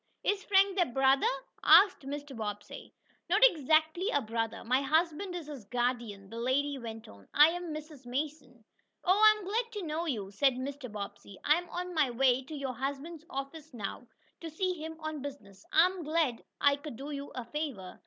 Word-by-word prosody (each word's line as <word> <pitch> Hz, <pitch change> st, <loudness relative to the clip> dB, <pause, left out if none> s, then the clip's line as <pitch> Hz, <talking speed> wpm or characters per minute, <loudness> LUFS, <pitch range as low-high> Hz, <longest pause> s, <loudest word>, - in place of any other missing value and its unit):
"Is 405 Hz, -1 st, 0 dB
Frank 390 Hz, -1 st, +4 dB
their 355 Hz, -, +3 dB
brother?" 270 Hz, +2 st, +4 dB, 0.4 s
asked 375 Hz, -9 st, +6 dB
Mr. 285 Hz, -1 st, -6 dB
Bobbsey. 205 Hz, -2 st, -6 dB, 0.4 s
"Not 415 Hz, +7 st, +6 dB
exactly 315 Hz, -, +2 dB
a 285 Hz, -, +2 dB
brother. 225 Hz, -2 st, -3 dB
My 255 Hz, +3 st, +2 dB
husband 330 Hz, +5 st, 0 dB
is 345 Hz, -3 st, -5 dB
his 285 Hz, -6 st, -8 dB
guardian," 235 Hz, -3 st, -2 dB
the 230 Hz, -, -6 dB
lady 275 Hz, +3 st, 0 dB
went 225 Hz, -2 st, -8 dB
on. 100 Hz, -1 st, -15 dB
"I 300 Hz, +2 st, +8 dB
am 350 Hz, 0 st, -4 dB
Mrs. 305 Hz, -4 st, -8 dB
Mason." 275 Hz, -3 st, -4 dB, 0.4 s
"Oh, 370 Hz, -, +5 dB
I 430 Hz, 0 st, +8 dB
am 415 Hz, -, -9 dB
glad 460 Hz, +4 st, -1 dB
to 415 Hz, -3 st, -4 dB
know 320 Hz, +2 st, -2 dB
you," 205 Hz, -9 st, -3 dB
said 265 Hz, +7 st, +3 dB
Mr. 265 Hz, -1 st, -5 dB
Bobbsey. 200 Hz, -1 st, -8 dB
"I 295 Hz, -, +5 dB
am 350 Hz, -, -11 dB
on 360 Hz, 0 st, -4 dB
my 305 Hz, -5 st, +3 dB
way 250 Hz, +1 st, +3 dB
to 310 Hz, -, -7 dB
your 275 Hz, -3 st, -3 dB
husband's 285 Hz, +6 st, -5 dB
office 275 Hz, +1 st, -6 dB
now, 225 Hz, +3 st, -6 dB, 0.3 s
to 330 Hz, -, -6 dB
see 365 Hz, +4 st, -1 dB
him 320 Hz, -1 st, -7 dB
on 310 Hz, -2 st, -4 dB
business. 215 Hz, -9 st, -9 dB
I 325 Hz, +2 st, +6 dB
am 370 Hz, 0 st, -2 dB
glad 305 Hz, -6 st, 0 dB, 0.2 s
I 285 Hz, 0 st, +4 dB
could 290 Hz, -3 st, -8 dB
do 275 Hz, +5 st, -7 dB
you 280 Hz, 0 st, -6 dB
a 250 Hz, -2 st, -4 dB
favor." 245 Hz, -10 st, -5 dB
285 Hz, 195 wpm, -31 LUFS, 245-325 Hz, 0.4 s, I